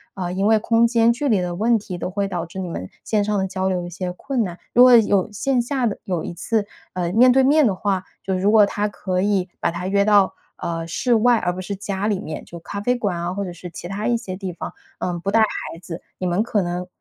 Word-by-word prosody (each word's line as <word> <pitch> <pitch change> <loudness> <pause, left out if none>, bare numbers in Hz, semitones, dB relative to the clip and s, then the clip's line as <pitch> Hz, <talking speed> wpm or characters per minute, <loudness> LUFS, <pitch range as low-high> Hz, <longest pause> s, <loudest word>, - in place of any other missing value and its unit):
能， 190 - -4
呃， - - -4
因 195 +2 0
为 220 - +5
空 230 +2 +3
间 230 0 +4
距 265 +5 -1
离 210 -7 +3
的 175 -1 -2
问 225 +5 +3
题 190 -4 -6
都 180 - -3
会 200 +1 -2
导 175 -3 -3
致 175 +3 -8
你 180 - -4
们 95 - -5
线 210 -2 +1
上 210 -1 0
的 190 - +1
交 190 0 -2
流 180 -2 -1
一 - - -6
些 180 +1 -4
困 260 +5 -2
难。 175 -2 -6 0.2
如 245 - +7
果 250 -1 +8
有 205 -4 +3
线 255 +3 +1
下 255 0 -1
的 210 - -1
有 180 -4 -2
一 - - -5
次， 210 +5 -1 0.3
呃， 175 -1 -2
面 245 +5 +6
对 265 - +5
面 290 +1 +5
的 195 - 0
话， 190 -1 -1 0.2
就 190 - -2
如 200 +3 +2
果 215 -2 +7
她 205 +1 -1
可 185 -3 -2
以 195 -3 +1
把 - - +1
她 175 +2 -5
约 200 +1 +2
到， 200 -2 +4 0.2
呃， 165 -1 -4
室 240 +8 0
外 235 +1 +4
而 175 - 0
不 185 - -7
是 200 +2 -4
家 200 +1 -3
里 205 -3 0
面， 155 - -6
就 170 - -10
咖 200 +3 -6
啡 245 +5 +1
馆 205 -7 -1
啊 175 +1 -2
或 200 - -3
者 185 - -5
是 175 +1 -9
其 175 +1 -8
它 205 +3 -3
一 240 - +2
些 190 -6 -5
地 190 -3 -5
方， - - -6 0.3
呃， 175 -1 -2
不 195 - -2
带 225 +1 +4
孩 210 -5 -2
子， 170 -1 -7 0.2
你 185 - -2
们 175 +3 +1
可 215 -3 0
能 180 +1 -3
195 Hz, 295 characters per minute, -22 LUFS, 180-220 Hz, 0.3 s, 果